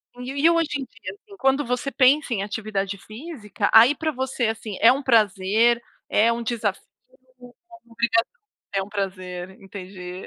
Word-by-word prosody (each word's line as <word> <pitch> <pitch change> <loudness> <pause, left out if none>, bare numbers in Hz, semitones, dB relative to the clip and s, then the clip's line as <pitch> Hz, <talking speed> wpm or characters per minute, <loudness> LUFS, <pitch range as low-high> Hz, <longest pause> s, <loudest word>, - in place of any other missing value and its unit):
Uhum. 245 - -9
E 280 +5 +2
o 335 - +3
hoje 330 -2 +1
em - - -3
dia, - - -9
assim, 405 0 -17
quando 270 +2 +2
você 250 +3 -2
pensa 270 0 +3
em 195 -3 -1
atividade 200 -2 -3
física, 215 - -5
aí 235 +6 +8
pra 315 +2 -2
você, 260 -3 -2
assim, 220 -2 -4
é 230 - +7
um 270 +2 0
prazer, 225 -1 +3 0.3
é 225 +2 +3
um 235 0 -3
desafio, 220 -4 -2 0.6
é - - -11 0.4
uma 235 - -19
obrigação? 230 0 +1 0.5
É 195 - +2
um 190 - -9
prazer. 185 -3 -5
Entendi. 185 -1 -9
230 Hz, 175 wpm, -23 LUFS, 200-265 Hz, 0.6 s, aí